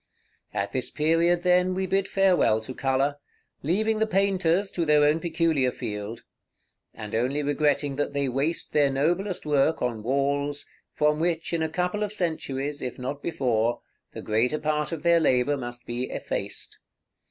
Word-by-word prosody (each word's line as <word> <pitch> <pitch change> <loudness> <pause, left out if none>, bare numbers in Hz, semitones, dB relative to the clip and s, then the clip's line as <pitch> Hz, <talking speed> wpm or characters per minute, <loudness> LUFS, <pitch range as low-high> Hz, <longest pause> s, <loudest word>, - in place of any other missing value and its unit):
At 100 0 -2
this 130 - 0
period, 165 +3 +2
then, 180 0 +3
we 190 0 -1
bid 195 +1 0
farewell 185 - +3
to 120 +4 -7
color, 135 +2 0 0.4
leaving 215 +8 +1
the 220 - +2
painters 195 -1 +1
to 170 - -1
their 150 -2 +4
own 150 +2 +3
peculiar 160 -6 +1
field; 105 +2 -6 0.7
and 110 -2 -9
only 130 +6 0
regretting 145 -1 +1
that 145 - -1
they 140 -1 -1
waste 140 +6 -2
their 145 -2 +4
noblest 175 +8 0
work 150 +1 +2
on 120 -3 -2
walls, 140 +4 0 0.3
from 150 0 +1
which 165 0 -1
in 165 - 0
a 160 - 0
couple 180 +5 -1
of 210 -1 -1
centuries, 150 -6 -2
if 125 - -4
not 135 +3 -5
before, 120 -7 0 0.3
the - - -7
greater 115 +7 +1
part 150 0 -1
of 165 -3 -5
their 170 0 +5
labor 135 -2 +2
must 120 -2 -7
be 120 +2 -3
effaced. - - -5
150 Hz, 165 wpm, -26 LUFS, 130-170 Hz, 0.7 s, their